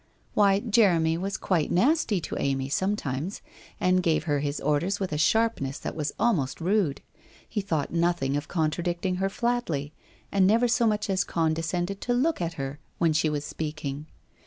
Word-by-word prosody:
Why, 200 -1 +4
Jeremy 190 -8 +3
was 195 +2 -2
quite 170 -6 0
nasty 230 - +2
to - - -5
Amy 135 -1 -1
sometimes, 180 -1 -2 0.4
and 185 0 +3
gave 165 -4 +1
her 145 -3 0
his 145 0 -2
orders 170 +7 0
with 190 -5 -2
a - - 0
sharpness 155 -6 +1
that - - -5
was 150 -2 -2
almost 160 - +1
rude. 180 -4 +1 0.5
He 210 - -2
thought 165 -7 -2
nothing 170 -5 +1
of 145 +1 -2
contradicting 175 +3 -1
her 195 +1 0
flatly, 195 - -1 0.4
and 195 -2 +4
never 230 +4 +4
so 235 0 +2
much 210 -1 0
as 195 0 +1
condescended 165 +4 -1
to 245 - 0
look 295 - +1
at 170 -1 -2
her 140 -1 -5 0.2
when 165 -2 +2
she 155 +1 +2
was 145 -1 -2
speaking. 150 -2 -5
175 Hz, 170 wpm, -27 LUFS, 150-200 Hz, 0.5 s, Why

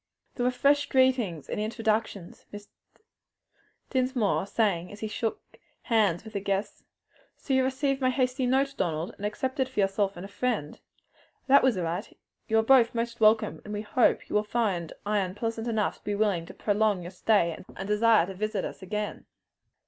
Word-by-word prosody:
There 245 - -2
were 250 - +3
fresh 285 +3 +2
greetings 250 - +2
and - - -3
introductions, 215 -4 -2
Mr. 205 0 -10 1.2
Dinsmore 255 -7 +1
saying, 195 -5 0
as 205 - -11
he 220 - -2
shook 220 +1 -3 0.4
hands 210 -7 +2
with 220 - -11
the 200 - -1
guests, 195 +1 -3 0.5
"So 275 - -3
you 265 0 +4
received 270 +1 0
my 255 - +3
hasty 255 0 0
note, 270 +2 +2
Donald, 165 - -2
and 205 - -3
accepted 260 +4 -2
for 260 - -5
yourself 195 -1 +1
and 185 +3 -7
friend? 200 -6 -2 0.7
That 280 +1 +6
was 255 -6 +2
right. 175 +3 -4 0.3
You 225 - +2
are 220 - +4
both 240 -1 +5
most 235 0 -2
welcome, 215 0 +3
and 210 0 -6
we 205 - -4
hope 230 +3 +2
will 210 - +1
find 200 -7 -1
Ion 200 -3 0
pleasant 225 +1 -3
enough 220 -3 -1
to - - -37
be 205 - -2
willing 200 -6 0
to - - -10
prolong 205 -3 +1
your 175 - -7
stay 190 -2 +2
and 160 - -9
to 190 - -5
desire 210 -2 +4
to 190 - -7
visit 215 +2 -2
us - - -7
again." 210 +2 -4
215 Hz, 180 wpm, -27 LUFS, 195-245 Hz, 1.2 s, That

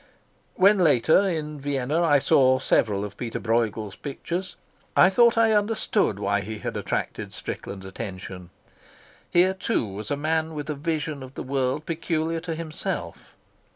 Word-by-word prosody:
When 200 +2 +5
later, 160 +4 +4
in 150 -3 -3
Vienna, 140 +3 0
I 155 -4 +5
saw 130 -1 +4
several 105 -5 +1
of 100 -1 -9
Peter 115 -2 -4
Brueghel's 110 -3 -1
pictures, 175 +6 -5 0.4
I 185 - +7
thought 235 +3 +5
I 225 -1 +5
understood 210 - +1
why 100 0 0
he 110 +3 -6
had - - -5
attracted - - -3
Strickland's 95 -1 -6
attention. 95 -2 -7 0.8
Here, 180 +2 +4
too, 190 - -1
was 105 +1 -7
a 145 - -1
man 160 +1 -1
with 150 0 -4
a - - -1
vision 155 -1 -3
of 130 +1 -10
the - - -5
world 135 +2 -1
peculiar 165 0 -1
to 165 -1 -4
himself. 160 +2 -5
150 Hz, 155 wpm, -25 LUFS, 115-170 Hz, 0.8 s, I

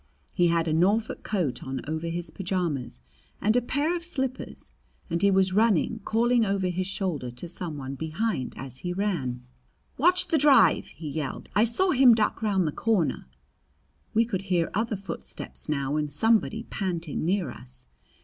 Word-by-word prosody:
He 175 -2 +3
had 165 0 +1
a 155 - +1
Norfolk 200 +7 +1
coat 165 - -2
on 130 0 -4
over 160 +2 -3
his 170 +1 -4
pajamas 170 - -3 0.4
and 215 +2 +2
a 245 - +4
pair 290 +8 0
of 340 - -4
slippers, 265 -6 -4 0.4
and 170 +1 0
he 200 - +5
was 190 -1 +3
running, 220 +1 +2
calling 235 +1 +2
over 195 -3 0
his 180 +1 -2
shoulder 180 -10 -2
to 125 +8 -7
some 165 -2 -5
one 135 -1 -5
behind 160 - -2
as 130 -1 -8
he 175 0 -3
ran. 145 -11 -2 0.5
"Watch 355 +5 +4
the 320 - +3
drive!" 275 -4 +5
he 160 - -9
yelled. 145 -2 -4
"I 215 - +4
saw 360 +12 +2
him 255 -4 +7
duck 220 0 0
round 200 -4 +1
the - - -1
corner." 200 - 0 0.9
We 230 +1 +4
could 200 -5 -2
hear 175 -2 +1
other 220 +2 0
footsteps 190 -4 -8
now 140 0 0
and 150 -1 -1
somebody 220 +7 +2
panting 175 -8 -3
near 175 -4 0
us. 125 +1 -13
185 Hz, 170 wpm, -27 LUFS, 155-225 Hz, 0.9 s, him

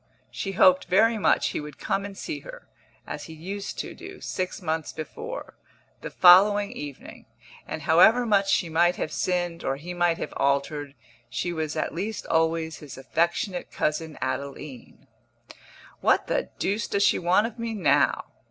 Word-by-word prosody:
She 195 - -4
hoped 185 0 +5
very 220 +5 +3
much - - +2
he - - -3
would 150 0 -9
come 195 +1 -2
and 200 -1 -8
see 315 -3 -5
her - - -12 0.4
as - - -6
he 160 - -10
used 195 +5 -6
to - - -5
do - - -11
six 185 +3 -4
months 160 -4 -2
before 460 - -7 0.5
the - - -6
following 200 +3 +6
evening; 145 -2 -9 0.4
and - - -5
however 220 +9 +5
much 200 -3 +2
she 180 - +2
might 170 +2 +3
have 155 - -3
sinned 175 -2 -1
or 135 - 0
he 165 +6 -7
might 175 -1 +1
have - - -5
altered, 140 +1 0 0.3
she 175 - -2
was 155 -2 -3
at 155 - -2
least 205 +6 -4
always 160 -1 0
his 145 -4 -10
affectionate 170 +7 -1
cousin 155 +1 -2
Adeline. 135 0 -6 0.9
"What - - +3
the - - -1
deuce 205 +3 -1
does 200 - +1
she - - +3
want 180 +5 +3
of 235 +1 -7
me 230 -1 -3
now?" 195 - +2
175 Hz, 165 wpm, -26 LUFS, 155-200 Hz, 0.9 s, following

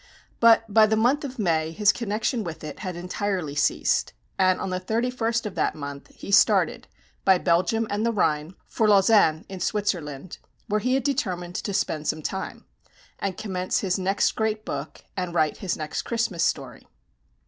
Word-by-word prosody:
But 230 -1 +6
by 215 +1 +5
the 220 - +2
month 245 +7 +2
of 265 -2 -6
May 165 -6 +1
his 205 +5 +3
connection 220 +1 -2
with 160 -4 -7
it 150 -1 -7
had 185 -3 -5
entirely 180 -3 -3
ceased; 145 0 +1 0.2
and 185 -1 +3
on 185 - -3
the 185 - -1
31st 230 +3 -1
of 210 - -4
that - - 0
month, 140 -2 -7
he - - -8
started, 200 - +4 0.4
by 190 -1 +5
Belgium 185 +7 +1
and 205 +1 -2
the 230 - +2
Rhine, 155 -4 0
for 220 - 0
Lausanne 195 -6 +4
in 190 -1 -8
Switzerland, 175 -6 -2 0.3
where 210 -1 0
he 255 +4 +1
had 270 - 0
determined 185 -11 -2
to 200 - -3
spend 155 -6 -1
some 155 - -1
time, 190 +4 -5 0.5
and 195 -2 -3
commence 185 -3 -2
his 190 -1 0
next 195 +2 +1
great 220 -1 -2
book, 145 +1 -6
and 180 -2 -3
write 155 -3 +2
his 185 -3 -3
next 155 -1 -3
Christmas 230 -8 -1
story. 135 -4 -2
190 Hz, 175 wpm, -25 LUFS, 170-220 Hz, 0.5 s, But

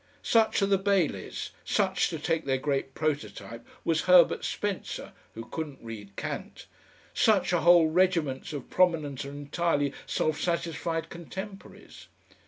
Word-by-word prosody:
Such 220 -3 +3
are - - +5
the 195 -1 +2
Baileys; 195 -1 -1
such, 190 -4 +1
to 165 - -4
take 165 +1 -1
their 135 -1 +1
great 135 -1 -2
prototype, 115 -7 -3 0.2
was 165 -1 +2
Herbert 180 -2 +6
Spencer 205 -2 -3 0.2
(who 115 0 -7
couldn't 150 0 -5
read 105 -4 -9
Kant); - - -6 0.5
such - - +3
are - - +2
whole 175 -1 +7
regiments 165 -5 +1
of 145 -4 -7
prominent 160 -7 +2
and 140 +1 -7
entirely 145 -2 0
self 155 -1 0
satisfied 170 -1 -2
contemporaries. 190 +4 -9
165 Hz, 135 wpm, -28 LUFS, 140-180 Hz, 0.5 s, whole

